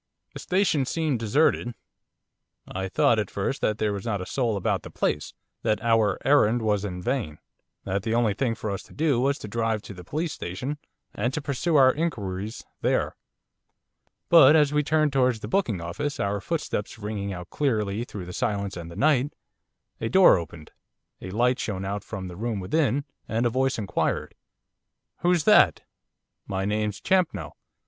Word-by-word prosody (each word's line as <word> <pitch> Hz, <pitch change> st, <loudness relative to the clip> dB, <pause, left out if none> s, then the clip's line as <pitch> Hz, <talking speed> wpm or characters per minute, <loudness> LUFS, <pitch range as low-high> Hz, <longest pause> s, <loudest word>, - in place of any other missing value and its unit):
The -, -, -7 dB
station 180 Hz, -8 st, +1 dB
seemed 155 Hz, -6 st, 0 dB
deserted. 120 Hz, +1 st, +1 dB, 0.9 s
I 95 Hz, 0 st, -4 dB
thought, 110 Hz, +3 st, +3 dB
at 105 Hz, -, -2 dB
first, 100 Hz, +7 st, -2 dB
that 105 Hz, -, +1 dB
there 105 Hz, -2 st, 0 dB
was 100 Hz, -1 st, -5 dB
not 105 Hz, -4 st, -1 dB
a 90 Hz, -, -5 dB
soul 115 Hz, -3 st, -1 dB
about 95 Hz, -, 0 dB
the -, -, -10 dB
place, 75 Hz, -, -2 dB, 0.3 s
that 105 Hz, -, +1 dB
our 110 Hz, -4 st, +3 dB
errand 120 Hz, -5 st, +4 dB
was 105 Hz, -2 st, +1 dB
in 90 Hz, -3 st, -5 dB
vain, 120 Hz, -, -2 dB, 0.5 s
that 100 Hz, +1 st, -1 dB
the 110 Hz, +3 st, -1 dB
only 115 Hz, -3 st, +2 dB
thing 115 Hz, +1 st, -1 dB
for 110 Hz, -2 st, -4 dB
us 100 Hz, -, -3 dB
to -, -, -17 dB
do 145 Hz, -5 st, +2 dB
was 140 Hz, +2 st, +1 dB
to -, -, -8 dB
drive 115 Hz, 0 st, -1 dB
to -, -, -9 dB
the 90 Hz, -1 st, -11 dB
police 155 Hz, -, -3 dB
station 125 Hz, +12 st, -5 dB, 0.3 s
and 120 Hz, +4 st, -1 dB
to -, -, -1 dB
pursue 150 Hz, +4 st, -1 dB
our 130 Hz, -2 st, +6 dB
inquiries 105 Hz, -, -3 dB, 0.2 s
there. -, -, +1 dB, 1.1 s
But 165 Hz, -2 st, +8 dB
as 150 Hz, -2 st, +4 dB
we 150 Hz, -, +3 dB
turned 155 Hz, 0 st, +1 dB
towards 125 Hz, -4 st, +2 dB
the -, -, -5 dB
booking 115 Hz, -, 0 dB
office, 90 Hz, +13 st, -4 dB
our 100 Hz, 0 st, -1 dB
footsteps 150 Hz, -12 st, -3 dB
ringing 105 Hz, -2 st, -4 dB
out 90 Hz, -1 st, -7 dB
clearly 110 Hz, -6 st, 0 dB
through 100 Hz, -6 st, -7 dB
the 90 Hz, -, -8 dB
silence 100 Hz, -5 st, -2 dB
and 85 Hz, -1 st, -7 dB
the 85 Hz, -, -10 dB
night, 145 Hz, -, +2 dB, 0.6 s
a 115 Hz, -, -2 dB
door 190 Hz, +9 st, +7 dB
opened, 85 Hz, -3 st, -7 dB, 0.5 s
a -, -, -6 dB
light 120 Hz, +6 st, +1 dB
shone 95 Hz, -3 st, -3 dB
out 100 Hz, +1 st, -3 dB
from 95 Hz, -4 st, -6 dB
the 90 Hz, -, -8 dB
room 110 Hz, +1 st, -2 dB
within, 140 Hz, -, 0 dB, 0.2 s
and 115 Hz, +2 st, 0 dB
a 120 Hz, -, +2 dB
voice 130 Hz, +2 st, +1 dB
inquired: 100 Hz, -5 st, -1 dB, 0.9 s
'Who's 175 Hz, -2 st, +2 dB
that?' -, -, +5 dB, 0.7 s
'My 95 Hz, 0 st, -2 dB
name's 105 Hz, -1 st, -1 dB
Champnell. 170 Hz, -, 0 dB
110 Hz, 180 wpm, -26 LUFS, 100-140 Hz, 1.1 s, But